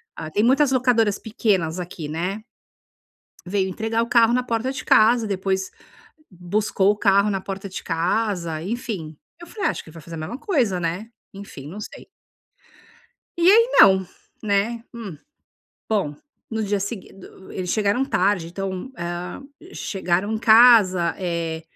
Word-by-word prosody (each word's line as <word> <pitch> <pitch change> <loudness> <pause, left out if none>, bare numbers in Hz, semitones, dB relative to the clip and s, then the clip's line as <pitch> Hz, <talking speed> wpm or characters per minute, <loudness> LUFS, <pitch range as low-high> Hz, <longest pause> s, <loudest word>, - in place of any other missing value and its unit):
ah, 155 - -6
tem 210 - +1
muitas 265 +3 +3
locadoras 235 -5 +2
pequenas 190 -7 -1
aqui 170 -4 -6
né." 180 +7 -3 1.0
Veio 190 0 -1
entregar 225 +4 -1
o - - -5
carro 235 -1 +4
na 250 0 +1
porta 235 +2 -2
de 270 - -7
casa, 225 +1 +5
depois 190 -1 -2 0.6
buscou 195 +2 0
o 210 - -4
carro 200 0 +3
na 195 -2 -2
porta 195 0 -6
de 185 - -7
casa, 170 -1 -1
enfim. 195 - -5 0.2
Eu 345 - -11
falei: 415 +1 -2
"Acho - - -4
que 160 - -14
vai 165 -1 -12
fazer 165 +2 -9
a - - -6
mesma 160 +11 -5
coisa, 250 - 0
né." 175 +7 -3 0.2
Enfim 195 -8 -10
não 195 +7 -8
sei. - - -10 1.3
E 345 +2 +5
aí 460 +4 +6
não, 190 -1 +7 0.4
né. 215 +3 0
Hum. 205 -10 -8 0.7
Bom, 195 -10 0 0.4
no 220 0 -2
dia 200 0 -1
segui 200 0 -6
do 190 0 -15
eles 180 -1 -4
chegaram 215 +5 +1
tarde 185 -7 +1
então, 190 +6 -5
hã, 175 +8 -5 0.3
chegaram 190 +2 -1
em 220 - -1
casa, 220 -7 +6
eh, 170 -3 -3
200 Hz, 155 wpm, -22 LUFS, 180-225 Hz, 1.3 s, não